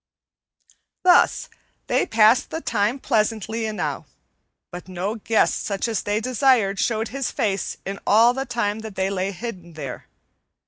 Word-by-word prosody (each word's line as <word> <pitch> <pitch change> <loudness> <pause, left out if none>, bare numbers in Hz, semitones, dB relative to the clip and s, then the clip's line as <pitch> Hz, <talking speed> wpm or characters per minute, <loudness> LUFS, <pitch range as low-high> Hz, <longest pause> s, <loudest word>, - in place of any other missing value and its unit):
Thus 365 +7 +4 0.4
they - - +1
passed 225 +2 +4
the 320 - -4
time 210 -4 0
pleasantly 225 -2 -1
enow, 215 -1 -3 0.6
but 175 0 -9
no 185 +3 -3
guest 225 0 +1
such 200 +2 -2
as 225 -3 -1
they 205 +1 -1
desired 235 -4 +2
showed 225 -1 0
his 270 +1 -3
face 200 -3 -2
in 195 +1 -5
all 230 +4 +6
the 270 +1 -4
time 220 -3 -1
that 220 -2 -8
they 190 0 -1
lay 190 0 -1
hidden 185 -4 -8
there. 140 -5 -7
215 Hz, 145 wpm, -23 LUFS, 195-235 Hz, 0.6 s, all